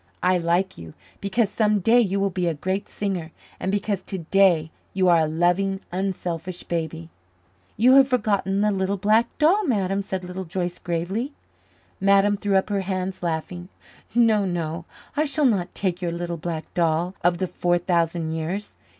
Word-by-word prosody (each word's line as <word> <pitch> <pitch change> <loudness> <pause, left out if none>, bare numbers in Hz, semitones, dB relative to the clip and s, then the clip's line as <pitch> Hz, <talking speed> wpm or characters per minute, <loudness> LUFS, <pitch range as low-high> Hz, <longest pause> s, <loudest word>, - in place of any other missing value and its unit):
I 180 0 +3
like 175 - 0
you 80 -1 -10 0.2
because 200 +1 0
some 210 -1 +2
day 225 +6 +4
you 200 -3 0
will 195 0 +1
be 180 -1 -1
a 165 - 0
great 190 +6 -3
singer 185 -6 -3 0.3
and 190 - -1
because 205 -1 -1
today 180 -3 +2 0.2
you 190 -1 +3
are 170 -1 +6
a 160 - +2
loving, 175 +4 +1
unselfish 180 -1 -3
baby." 165 -1 -4 0.7
"You 245 +5 +6
have 270 -1 +7
forgotten 205 -6 +1
the 210 0 +3
little 195 0 -1
black 215 +4 +3
doll, 355 +8 +4
Madame," 195 -5 +1
said 190 -1 -4
Little 180 +1 -5
Joyce 175 0 -3
gravely. 190 - -2 0.7
Madame 200 +1 +4
threw 200 -1 -1
up 190 +2 +2
her 200 -1 +1
hands, 185 0 -3
laughing. 175 +1 -3 0.5
"No, 225 -3 +4
no, 170 -2 -3 0.3
I 305 - +2
shall 285 0 +1
not 190 -8 +1
take 185 -2 -2
your 175 -1 -1
little 170 0 -3
black 160 -1 -5
doll 170 +1 +1
of 175 0 +3
the 185 - -1
four 175 -1 0
thousand 170 -2 0
years. 170 +6 -4
185 Hz, 170 wpm, -24 LUFS, 170-200 Hz, 0.7 s, have